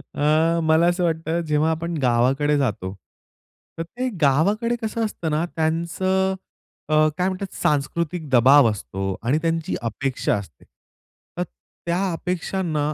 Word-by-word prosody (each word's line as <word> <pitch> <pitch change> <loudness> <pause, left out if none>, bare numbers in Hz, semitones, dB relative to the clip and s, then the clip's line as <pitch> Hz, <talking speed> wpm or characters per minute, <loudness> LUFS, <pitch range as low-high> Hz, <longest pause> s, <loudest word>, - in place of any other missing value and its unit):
अ, 160 +3 +2
मला 160 +1 +4
असं 175 +1 +1
वाटतं. 165 0 0
जेव्हा 150 +1 +2
आपण 165 +1 -3
गावाकडे 130 +4 +2
जातो. 105 -8 -1 0.8
तर 165 - -2
ते 250 +9 -4
गावाकडे 200 - +2
कसं 225 +1 -1
असतं 175 -6 -4
ना 155 +3 +1
त्यांचं 180 +4 0 0.5
अ, 155 0 +4
काय 180 - +1
म्हणतात 190 0 -4
सांस्कृतिक 155 +3 -1
दबाव 130 +1 +6
असतो 95 -2 -4
आणि 125 +6 +2
त्यांची 165 -1 -1
अपेक्षा 125 +3 -1
असते. 95 -10 -8 0.7
तर 180 - 0 0.4
त्या 180 +2 0
अपेक्षांना 165 -3 -2
160 Hz, 130 wpm, -23 LUFS, 140-175 Hz, 0.8 s, दबाव